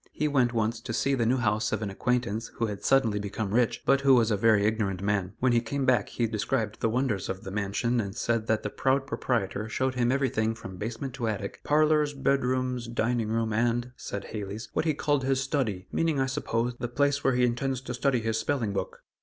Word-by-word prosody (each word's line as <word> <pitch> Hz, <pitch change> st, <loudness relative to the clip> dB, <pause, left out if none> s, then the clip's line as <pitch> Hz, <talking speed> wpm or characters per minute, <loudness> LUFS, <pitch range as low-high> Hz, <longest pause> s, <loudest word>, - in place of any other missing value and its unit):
He 150 Hz, -, -1 dB
went 130 Hz, -5 st, +2 dB
once 115 Hz, -1 st, 0 dB
to 115 Hz, -1 st, -5 dB
see 135 Hz, +4 st, +1 dB
the 120 Hz, -4 st, +1 dB
new 130 Hz, +3 st, +3 dB
house 110 Hz, -2 st, +1 dB
of 110 Hz, 0 st, -1 dB
an 100 Hz, -, -3 dB
acquaintance 115 Hz, 0 st, -1 dB
who 115 Hz, -, 0 dB
had 105 Hz, -3 st, -5 dB
suddenly 115 Hz, -6 st, +3 dB
become 100 Hz, 0 st, -3 dB
rich, 120 Hz, 0 st, +1 dB
but 140 Hz, -, +4 dB
who 135 Hz, -1 st, +6 dB
was 115 Hz, -2 st, +3 dB
a -, -, +3 dB
very 105 Hz, 0 st, +4 dB
ignorant 105 Hz, -4 st, 0 dB
man. 100 Hz, -2 st, 0 dB
When 130 Hz, 0 st, +3 dB
he 120 Hz, -1 st, +3 dB
came 135 Hz, +4 st, -2 dB
back 125 Hz, -5 st, +2 dB
he 120 Hz, -, -1 dB
described 110 Hz, 0 st, -1 dB
the 115 Hz, -, +1 dB
wonders 115 Hz, -5 st, -1 dB
of 95 Hz, 0 st, -4 dB
the 95 Hz, -, -6 dB
mansion 105 Hz, +4 st, 0 dB
and 100 Hz, -2 st, -6 dB
said 115 Hz, -1 st, -1 dB
that 110 Hz, -1 st, +1 dB
the 105 Hz, -, -3 dB
proud 135 Hz, +1 st, +1 dB
proprietor 110 Hz, -5 st, -2 dB
showed 130 Hz, +3 st, 0 dB
him 125 Hz, -1 st, +1 dB
everything 115 Hz, -5 st, +1 dB
from 95 Hz, -5 st, -9 dB
basement 115 Hz, +6 st, -4 dB
to 125 Hz, -4 st, -3 dB
attic; 100 Hz, -2 st, -4 dB
"parlors, 150 Hz, -1 st, +3 dB
bed 135 Hz, 0 st, +1 dB
rooms, 125 Hz, -1 st, -1 dB
dining 115 Hz, -1 st, 0 dB
room, 110 Hz, -1 st, 0 dB
and," 120 Hz, +2 st, 0 dB
said 100 Hz, 0 st, -6 dB
Hales, 105 Hz, +1 st, -6 dB
"what -, -, 0 dB
he 155 Hz, -3 st, +1 dB
called 145 Hz, -2 st, +1 dB
his 135 Hz, 0 st, +1 dB
'study' 120 Hz, -9 st, -2 dB
meaning, 160 Hz, -4 st, +1 dB
I 135 Hz, -, +3 dB
suppose, 120 Hz, -2 st, -1 dB
the 120 Hz, -, -2 dB
place 140 Hz, +3 st, +1 dB
where 135 Hz, -2 st, +3 dB
he 125 Hz, 0 st, +4 dB
intends 125 Hz, +2 st, -1 dB
to 125 Hz, -1 st, -5 dB
study 125 Hz, 0 st, +1 dB
his 110 Hz, 0 st, -1 dB
spelling 115 Hz, -8 st, -1 dB
book!" 95 Hz, -2 st, -4 dB
120 Hz, 230 wpm, -28 LUFS, 110-130 Hz, -, who